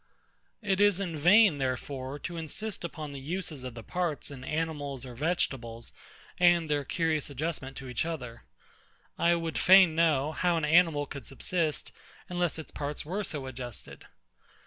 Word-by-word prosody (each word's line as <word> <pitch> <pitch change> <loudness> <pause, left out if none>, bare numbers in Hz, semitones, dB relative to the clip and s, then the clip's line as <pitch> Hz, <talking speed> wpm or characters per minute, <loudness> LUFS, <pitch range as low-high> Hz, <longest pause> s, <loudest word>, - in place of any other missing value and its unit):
It 195 -1 +1
is 205 -2 +5
in 180 -5 -3
vain, 175 +1 +6
therefore, 130 +1 -3
to 170 +4 -6
insist 175 +6 -4
upon 155 -3 -5
the 140 - -7
uses 160 -1 -4
of 125 -2 -6
the 115 - -8
parts 175 -4 -2
in 130 -2 -9
animals 145 -3 -3
or 125 - -8
vegetables, 120 -6 -2 0.5
and 175 -3 +4
their 145 -1 +1
curious 155 0 0
adjustment 140 -2 -4
to 135 - -7
each 125 -2 -1
other. 125 -9 -5 0.8
I 170 0 +4
would 165 -1 -2
fain 185 -3 +7
know, 155 -3 +2
how 175 +1 +1
an 160 - 0
animal 160 -2 +4
could 140 -3 -8
subsist, 155 +3 -1 0.4
unless 175 -2 0
its 160 - -8
parts 145 0 -4
were 195 +7 -2
so 150 -7 -4
adjusted? 125 -3 -8
155 Hz, 160 wpm, -29 LUFS, 135-175 Hz, 0.8 s, fain